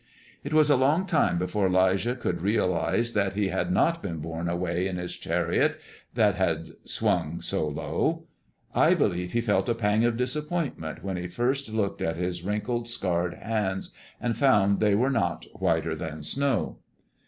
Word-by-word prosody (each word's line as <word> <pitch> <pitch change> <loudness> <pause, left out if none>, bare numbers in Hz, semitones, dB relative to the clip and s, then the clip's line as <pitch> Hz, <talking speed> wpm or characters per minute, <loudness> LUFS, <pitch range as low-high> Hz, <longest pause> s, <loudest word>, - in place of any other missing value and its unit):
It - - -5
was 155 -1 +5
a - - +6
long 145 +8 +3
time 165 - +2
before 95 +2 0
'Lijah 95 +6 +2
could 90 -9 -2
realize 105 +3 +1
that 100 -2 +1
he 100 -1 0
had 180 - -1
not 170 -2 +2
been 85 -4 -4
borne 80 +2 -4
away 85 +1 -1
in 95 -2 -3
his 90 0 -5
chariot, - - 0 0.4
that - - +4
had - - -1
swung 80 +3 0
so 75 - -1
low. 75 - -1 0.5
I - - +5
believe 90 0 0
he 120 - +2
felt 115 +1 +1
a 115 - +2
pang 110 0 +2
of 120 -1 +2
disappointment 135 - -3
when 95 -2 -3
he 90 0 -4
first 125 +7 -1
looked 105 -2 -1
at 80 0 -1
his 90 0 -2
wrinkled, 110 +5 -2
scarred 90 -6 -1
hands, 105 -4 -2 0.3
and 120 -1 -1
found 100 -7 +4
they 105 -2 +3
were 125 +6 +2
not 100 -9 -1
"whiter 80 -3 0
than 80 -2 -6
snow." 125 - 0
100 Hz, 170 wpm, -27 LUFS, 90-120 Hz, 0.5 s, a